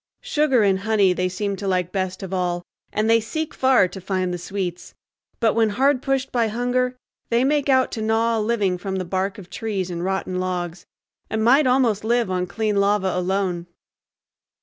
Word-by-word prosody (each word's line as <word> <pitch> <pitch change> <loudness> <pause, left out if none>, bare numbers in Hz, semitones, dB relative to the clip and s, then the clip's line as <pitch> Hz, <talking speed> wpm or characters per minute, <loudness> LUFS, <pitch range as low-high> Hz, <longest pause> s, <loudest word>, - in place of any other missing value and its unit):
Sugar 300 - +2
and 195 -2 +3
honey 200 -2 +3
they 185 0 -1
seem 200 +2 -2
to 200 - -4
like 180 -2 0
best 185 -1 -3
of 190 0 -6
all, 175 -1 -1 0.3
and 215 +1 0
they 230 0 +5
seek 310 +8 -4
far 260 -7 +4
to 190 - -9
find 185 -1 -1
the 175 - -4
sweets; 180 -1 -5 0.4
but 225 -3 +3
when 225 -1 +3
hard 260 +4 +2
pushed 270 -1 -1
by 235 -2 +2
hunger 250 +3 -1 0.3
they 235 +1 +2
make 285 +1 +1
out 260 -1 +3
to 220 - -4
gnaw 225 +1 +1
a - - 0
living 210 -5 0
from 190 +1 -4
the 185 -1 -2
bark 190 +2 -2
of 195 -4 -10
trees 195 -5 -3
and 170 0 -4
rotten 190 -1 -2
logs, 175 -1 -3 0.4
and 220 0 -1
might 265 +5 +5
almost 250 -5 +2
live 235 -3 +1
on 180 0 -1
clean 210 +2 -1
lava 200 -1 +2
alone. 180 -1 -1
205 Hz, 195 wpm, -22 LUFS, 185-235 Hz, 0.4 s, they